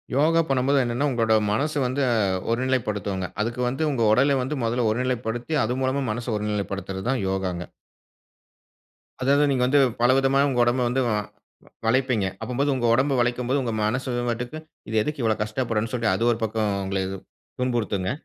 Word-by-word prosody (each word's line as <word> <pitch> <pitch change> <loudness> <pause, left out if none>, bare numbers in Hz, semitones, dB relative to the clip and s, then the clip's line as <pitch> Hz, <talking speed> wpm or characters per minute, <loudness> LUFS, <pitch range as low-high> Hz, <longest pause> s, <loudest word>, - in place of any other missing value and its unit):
யோகா 160 +4 +4
பண்ணும்போது 135 +1 +2
என்னன்னா, 120 +5 0
உங்களோட 115 -2 +2 0.2
மனசு 150 +7 0
வந்து 130 +3 0 0.5
ஒருநிலைப்படுத்துங்க. 105 -6 -1
அதுக்கு 120 +3 -2
வந்து 135 +6 -1
உங்க 125 -5 0
உடல 135 +4 +3
வந்து 135 +3 -3
மொதல்ல 115 0 +1
ஒருநிலைப்படுத்தி, 120 +2 -2
அது 120 +3 -1
மூலமா 135 +2 0
மனச 120 +2 -5
ஒருநிலைப்படுத்துறது 100 -2 -3
தான் 130 -4 0
யோகாங்க! 95 -2 -3 1.5
அதாவது 140 +3 +3
நீங்க 130 -2 +1
வந்து 145 +3 +4 0.2
பலவிதமா 135 +2 +3
உங்க 125 -2 -1
உடம்ப 120 +2 +1
வந்து, 130 +2 +1
வ - - 0 0.7
வளைப்பீங்க. 125 -3 +2 0.2
அப்பம்போது 135 +4 -1
உங்க 120 -2 -1
உடம்ப 135 +4 +2
வளைக்கும்போது 125 +3 0
உங்க 115 -3 -2
மனசு 125 +4 -1 0.2
வாட்டுக்கு, 120 +6 -4 0.3
இது 110 - -3
எதுக்கு 150 +3 -3
இவ்வளவு 110 -1 +1
கஷ்டப்படும்னு 115 0 -2
சொல்ட்டு 115 -5 +1
அது 115 - -1
ஒரு 115 - 0
பக்கம் 110 -1 0
உங்கள 95 0 -1 0.6
துன்புறுத்துங்க. 105 -6 -1
120 Hz, 150 wpm, -24 LUFS, 110-130 Hz, 1.5 s, யோகா